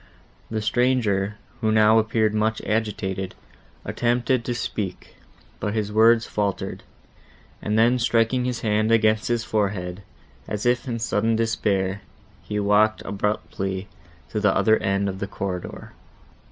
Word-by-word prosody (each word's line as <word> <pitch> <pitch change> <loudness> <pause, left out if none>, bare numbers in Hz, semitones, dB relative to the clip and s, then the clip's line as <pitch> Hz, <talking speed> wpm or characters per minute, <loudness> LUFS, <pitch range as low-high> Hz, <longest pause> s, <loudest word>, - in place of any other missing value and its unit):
The 110 -1 -2
stranger, 110 -4 +1 0.2
who 110 -2 +1
now 110 +1 +5
appeared 110 -1 +1
much 110 +1 +1
agitated, 95 -4 -2 0.5
attempted 120 +1 +1
to 120 - -2
speak, 100 -5 -5 0.4
but 105 +1 -2
his 105 -1 -1
words 115 +2 +5
faltered; 100 -2 -2 0.8
and 105 +1 -1
then 120 +3 +4
striking 120 +1 +2
his 125 -2 -2
hand 110 0 +1
against 110 -1 +3
his 120 -1 0
forehead, 100 -4 -2 0.5
as 105 +1 -4
if 125 +2 +1
in 120 -2 -2
sudden 115 0 +1
despair, 105 -4 0 0.4
he 105 - -3
walked 105 +2 +3
abruptly 95 -1 -2 0.4
to 105 - -1
the 105 -2 +2
other 110 -1 +4
end 100 +1 0
of 95 -1 -4
the 100 - -3
corridor. 95 -3 -5
110 Hz, 135 wpm, -24 LUFS, 100-115 Hz, 0.8 s, now